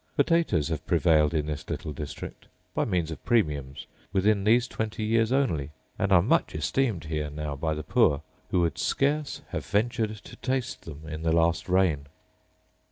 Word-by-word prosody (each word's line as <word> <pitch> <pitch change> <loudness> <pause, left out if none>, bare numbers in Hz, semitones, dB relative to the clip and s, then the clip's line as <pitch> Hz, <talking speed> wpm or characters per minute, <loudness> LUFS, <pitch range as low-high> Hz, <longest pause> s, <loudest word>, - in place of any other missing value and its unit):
Potatoes 160 - +2
have 80 -1 -3
prevailed 80 -3 +4
in 75 -3 0
this 75 -1 -5
little 75 - -4
district, 75 0 -7 0.3
by - - +1
means 90 -6 0
of 80 - -7
premiums, 75 - 0 0.3
within 100 +1 +2
these 120 +3 +4
twenty 110 0 -3
years 115 +1 +2
only; 100 - +1 0.3
and 100 - +1
are 85 -3 +6
much 165 - +2
esteemed 120 -10 0
here 75 -1 -3
now 75 0 -4
by 80 +2 -1
the 75 - -5
poor, 70 -2 +3 0.3
who 90 - +2
would 85 -3 0
scarce 145 +1 0
have - - -3
ventured 110 0 0
to 105 - -12
taste 130 +1 -2
them 75 -1 -9
in 80 0 -5
the 80 0 +1
last 85 +2 +2
reign. 90 -7 +2
85 Hz, 170 wpm, -27 LUFS, 75-110 Hz, 0.3 s, are